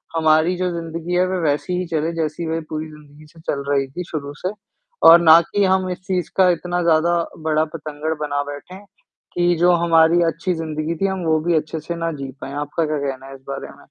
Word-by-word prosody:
हमारी 160 Hz, +2 st, +3 dB
जो 185 Hz, 0 st, 0 dB
ज़िंदगी 165 Hz, +1 st, -5 dB
है, 180 Hz, +1 st, +3 dB
वह 185 Hz, -, -1 dB
वैसी 150 Hz, +5 st, -1 dB
ही 185 Hz, -, -2 dB
चले 160 Hz, 0 st, -1 dB
जैसी 155 Hz, +2 st, -3 dB
वह 165 Hz, +1 st, -2 dB
पूरी 155 Hz, 0 st, -4 dB
ज़िंदगी 150 Hz, 0 st, -16 dB
से 165 Hz, +1 st, -19 dB
चल 140 Hz, -1 st, -3 dB
रही 135 Hz, -1 st, +1 dB
थी 175 Hz, +7 st, -6 dB
शुरू 145 Hz, -2 st, -4 dB
से, 185 Hz, -, -3 dB, 0.6 s
और 170 Hz, +1 st, +9 dB
ना 165 Hz, 0 st, +8 dB
कि 205 Hz, -1 st, +3 dB
हम 185 Hz, 0 st, +1 dB
इस 180 Hz, -, -5 dB
चीज़ 180 Hz, -3 st, -1 dB
का 185 Hz, -1 st, +6 dB
इतना 175 Hz, +1 st, -2 dB
ज़्यादा 170 Hz, +1 st, +3 dB, 0.3 s
बड़ा 155 Hz, 0 st, +2 dB
बतंगड़ 155 Hz, 0 st, -4 dB
बना 145 Hz, -1 st, -1 dB
बैठे, 180 Hz, +6 st, -10 dB, 0.6 s
कि 175 Hz, 0 st, +2 dB
जो 175 Hz, +1 st, +5 dB
हमारी 165 Hz, +1 st, +5 dB
अच्छी 175 Hz, +3 st, -2 dB
ज़िंदगी 160 Hz, 0 st, -3 dB
थी 195 Hz, -, +3 dB
हम 190 Hz, -1 st, -2 dB
वो 160 Hz, -1 st, +2 dB
भी 175 Hz, -, +3 dB
अच्छे 155 Hz, +1 st, -3 dB
से 170 Hz, +3 st, -5 dB
ना 165 Hz, 0 st, -2 dB
जी 135 Hz, -2 st, -6 dB
पाएँ। 135 Hz, -, -6 dB
आपका 150 Hz, +2 st, -1 dB
क्या 155 Hz, 0 st, -1 dB
कहना 135 Hz, -2 st, -4 dB
है 135 Hz, -, -9 dB
इस 135 Hz, -, -15 dB
बारे 135 Hz, -, -5 dB
में? -, -, -17 dB
160 Hz, 225 wpm, -20 LUFS, 150-175 Hz, 0.6 s, और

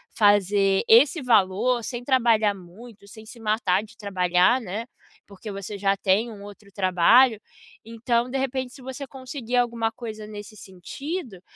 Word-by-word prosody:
fazer 200 Hz, -1 st, +3 dB
esse 265 Hz, +6 st, +5 dB
valor 230 Hz, +2 st, +2 dB
sem 245 Hz, 0 st, -6 dB
trabalhar 230 Hz, -5 st, +2 dB
muito, 200 Hz, +4 st, -14 dB
sem 220 Hz, +1 st, -13 dB
se 235 Hz, +2 st, -13 dB
matar 215 Hz, -3 st, 0 dB
de 220 Hz, -, -16 dB
trabalhar, 185 Hz, +4 st, +2 dB
né. 215 Hz, +3 st, -5 dB, 0.4 s
Porque 205 Hz, +1 st, -10 dB
você 200 Hz, +1 st, -7 dB
já 195 Hz, 0 st, +1 dB
tem 200 Hz, +5 st, +1 dB
um 200 Hz, -2 st, -11 dB
outro 205 Hz, 0 st, -13 dB
trabalho, 205 Hz, +5 st, +4 dB, 0.4 s
então 235 Hz, +2 st, -1 dB
de 270 Hz, -, -3 dB
repente 260 Hz, -1 st, -3 dB
se 270 Hz, -, -14 dB
você 265 Hz, +1 st, -7 dB
conseguir 255 Hz, -2 st, -6 dB
alguma 230 Hz, -2 st, 0 dB
coisa 220 Hz, -2 st, -8 dB
nesse 210 Hz, 0 st, -10 dB
sentido, 210 Hz, -, -7 dB
220 Hz, 150 wpm, -24 LUFS, 200-245 Hz, 0.4 s, esse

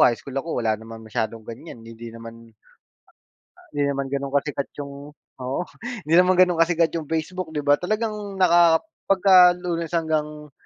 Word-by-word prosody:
high 120 Hz, -, +5 dB
school 135 Hz, -, -11 dB
ako, 135 Hz, -6 st, -3 dB
wala 110 Hz, -, +3 dB
naman 115 Hz, 0 st, -10 dB
masyadong 110 Hz, 0 st, -3 dB
ganyan, 115 Hz, +1 st, -10 dB
hindi 115 Hz, +1 st, -10 dB
naman 115 Hz, 0 st, -12 dB, 1.2 s
Hindi 145 Hz, -1 st, -1 dB
naman 140 Hz, -1 st, -2 dB
ganun 140 Hz, 0 st, -3 dB
kasikat 140 Hz, -1 st, -1 dB
'yong 140 Hz, -1 st, -6 dB, 0.5 s
oo, 130 Hz, +5 st, -2 dB, 0.4 s
hindi 160 Hz, +2 st, +2 dB
naman 180 Hz, +1 st, +5 dB
ganun 180 Hz, -2 st, +4 dB
kasikat 165 Hz, 0 st, +3 dB
'yong 160 Hz, -3 st, -4 dB
Facebook, 165 Hz, +2 st, -3 dB
'di 150 Hz, -, -2 dB
ba? 145 Hz, 0 st, +5 dB
Talagang 210 Hz, +1 st, -3 dB
naka 170 Hz, -2 st, +5 dB, 0.2 s
pagka 185 Hz, -2 st, +6 dB
Lunes 170 Hz, -2 st, -4 dB
hanggang 150 Hz, -2 st, -2 dB
155 Hz, 160 wpm, -23 LUFS, 125-175 Hz, 1.2 s, pagka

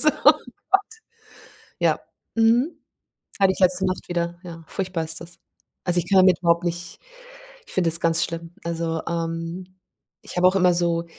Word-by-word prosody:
So, 305 Hz, -, +6 dB, 0.2 s
oh -, -, +10 dB, 0.4 s
Gott. 390 Hz, -, +6 dB, 1.0 s
Ja, -, -, +2 dB, 0.4 s
mhm. 230 Hz, +7 st, +3 dB, 0.6 s
Hatte 195 Hz, -1 st, +5 dB
ich -, -, -9 dB
letzte 185 Hz, 0 st, +3 dB
Nacht 185 Hz, 0 st, -3 dB
wieder. 175 Hz, 0 st, -2 dB
Ja, 165 Hz, -2 st, -9 dB
furchtbar 185 Hz, -4 st, -3 dB
ist 160 Hz, +2 st, -4 dB
das. 170 Hz, +1 st, -11 dB, 0.5 s
Also, 175 Hz, -1 st, +2 dB
ich 170 Hz, -, -4 dB
kann 195 Hz, -, +4 dB
damit 185 Hz, -2 st, +5 dB
überhaupt 170 Hz, 0 st, +2 dB
nicht 175 Hz, 0 st, -4 dB, 0.7 s
ich -, -, -13 dB
finde 175 Hz, -3 st, +2 dB
das 165 Hz, +1 st, +1 dB
ganz 165 Hz, -1 st, +2 dB
schlimm. 165 Hz, 0 st, -6 dB
Also, 165 Hz, -1 st, -2 dB
ähm, 165 Hz, +2 st, -4 dB, 0.5 s
ich -, -, -8 dB
habe 180 Hz, +1 st, +6 dB
auch 185 Hz, -, +2 dB
immer 180 Hz, -2 st, +4 dB
so 170 Hz, -1 st, +1 dB
175 Hz, 170 wpm, -23 LUFS, 165-185 Hz, 1.0 s, oh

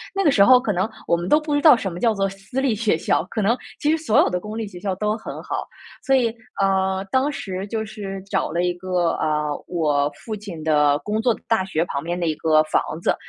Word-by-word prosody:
那 390 Hz, -, +1 dB
个 310 Hz, -, +5 dB
时 200 Hz, -, +5 dB
候 255 Hz, 0 st, +7 dB
可 225 Hz, -5 st, -1 dB
能 185 Hz, +3 st, 0 dB, 0.2 s
我 170 Hz, -, +3 dB
们 175 Hz, +1 st, -4 dB
都 300 Hz, -, +5 dB
不 305 Hz, -1 st, -2 dB
知 290 Hz, -, +1 dB
道 300 Hz, -4 st, +8 dB
什 200 Hz, -5 st, -3 dB
么 170 Hz, -, -7 dB
叫 230 Hz, -2 st, +2 dB
做 195 Hz, -1 st, 0 dB
私 195 Hz, +7 st, -5 dB
立 260 Hz, -5 st, +1 dB
学 215 Hz, -5 st, +1 dB
校， 160 Hz, -, 0 dB
可 220 Hz, -, -1 dB
能 225 Hz, +5 st, +2 dB, 0.2 s
其 295 Hz, -, 0 dB
实 320 Hz, -, +3 dB
所 315 Hz, -9 st, +2 dB
有 -, -, +4 dB
的 180 Hz, -, -1 dB
公 210 Hz, +3 st, -7 dB
立 225 Hz, -1 st, -3 dB
学 180 Hz, -3 st, -10 dB
校 195 Hz, 0 st, -2 dB
都 210 Hz, +2 st, -1 dB
很 225 Hz, -, -7 dB
好。 -, -, -4 dB, 0.4 s
所 270 Hz, -, +4 dB
以 250 Hz, -3 st, +3 dB, 0.3 s
呃， 190 Hz, 0 st, +1 dB
当 265 Hz, +3 st, +2 dB
时 195 Hz, -9 st, -5 dB
就 220 Hz, +1 st, -2 dB
是 195 Hz, -3 st, -7 dB
找 -, -, -1 dB
了 170 Hz, +2 st, 0 dB
一 180 Hz, 0 st, +1 dB
个， 180 Hz, -1 st, 0 dB
啊， 150 Hz, -1 st, 0 dB, 0.2 s
我 150 Hz, -4 st, +1 dB, 0.2 s
父 220 Hz, -2 st, -3 dB
亲 195 Hz, -6 st, -8 dB
的 150 Hz, -2 st, +3 dB
工 210 Hz, +8 st, -2 dB
作 240 Hz, 0 st, +3 dB
的 -, -, -12 dB
大 225 Hz, -5 st, +1 dB
学 165 Hz, -4 st, 0 dB
旁 140 Hz, -4 st, -4 dB
边 175 Hz, +2 st, -3 dB
的 170 Hz, -, -1 dB
一 155 Hz, -, 0 dB
个 155 Hz, -1 st, +3 dB
房 155 Hz, -, +1 dB, 0.2 s
子。 -, -, +2 dB
195 Hz, 280 characters per minute, -22 LUFS, 175-225 Hz, 0.4 s, 道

